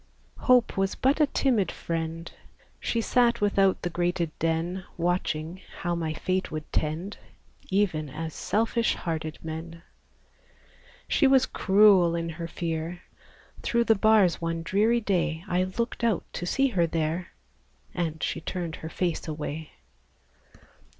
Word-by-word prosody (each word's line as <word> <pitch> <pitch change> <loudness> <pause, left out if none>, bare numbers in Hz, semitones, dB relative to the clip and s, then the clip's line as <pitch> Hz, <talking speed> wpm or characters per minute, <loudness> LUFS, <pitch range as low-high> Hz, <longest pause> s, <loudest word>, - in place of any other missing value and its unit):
Hope 250 -5 +3
Was 195 0 +1
but 275 +4 +2
a 300 - +5
timid 245 -8 +1
friend; 165 0 -4 0.5
She 230 - -1
sat 235 0 +3
without 195 -2 +2
the 175 - 0
grated 175 -1 0
den, 165 +3 -1
Watching 170 0 -1 0.2
how 175 0 0
my 165 -2 -2
fate 185 +4 -1
would 155 -1 -5
tend, 160 +6 -2 0.5
Even 180 -7 +1
as 160 +3 -5
selfish 230 +1 0
hearted 160 -2 -4
men. 165 +1 -7 1.2
She 280 - +4
was 265 -1 +5
cruel 190 -4 +5
in 170 0 -2
her 165 +1 -5
fear; 165 +1 -4 0.6
Through 235 0 +2
the 225 - +5
bars 215 -5 +4
one 165 0 -2
dreary 220 +7 +2
day, 175 -5 0
I 180 0 +1
looked 230 +6 -3
out 225 -7 +2
to 175 - -4
see 275 +7 +2
her 175 -8 +2
there, 165 +2 -2 0.6
And 160 -3 -2
she - - -2
turned 170 -3 -4
her 160 - -7
face 175 -1 -2
away! 155 0 -5
175 Hz, 135 wpm, -27 LUFS, 165-205 Hz, 1.2 s, a